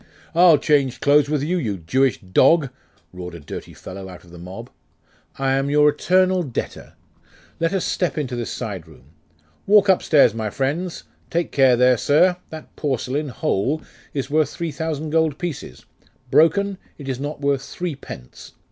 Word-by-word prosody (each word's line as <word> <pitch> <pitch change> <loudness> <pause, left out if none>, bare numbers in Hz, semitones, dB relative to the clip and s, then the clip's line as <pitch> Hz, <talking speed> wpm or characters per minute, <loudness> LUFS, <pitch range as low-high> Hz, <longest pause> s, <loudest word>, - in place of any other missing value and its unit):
'I'll 170 -2 +6
change 140 -3 +1
clothes 145 0 +4
with 150 -2 0
you, 180 +4 0
you 105 - -2
Jewish 125 +10 +1
dog!' 135 - +3 0.4
roared 90 -1 -8
a - - -9
dirty 70 - -9
fellow 95 0 -9
out 90 - -12
of 85 - -18
the 85 - -12
mob. 95 +7 -9 0.7
'I 135 -1 0
am 135 +1 +1
your 150 +1 +5
eternal 185 +4 +2
debtor. 135 -8 -6 0.6
Let 165 +1 +1
us 195 -3 -1
step 180 -3 -1
into 130 -5 -2
this 120 -1 -4
side 100 -9 -5
room. 75 -3 -18 0.6
Walk 205 0 +5
upstairs, 150 - +4
my 110 -2 -3
friends. 150 - -3 0.3
Take 170 0 -1
care 135 -3 +5
there, 125 0 +4
sir! 175 +9 +3
That 160 -1 -10
porcelain, 140 +1 -2
whole, 130 +5 -1 0.3
is 135 -2 -3
worth 150 -1 +1
three 170 -2 -4
thousand 155 +1 -4
gold 160 -3 +1
pieces: 150 - -6 0.5
broken, 195 +4 +3 0.2
it 140 - -10
is 130 -2 -3
not 145 +2 -5
worth 140 -1 +1
three 175 +3 -4
pence. 65 - -11
140 Hz, 165 wpm, -21 LUFS, 120-160 Hz, 0.7 s, I'll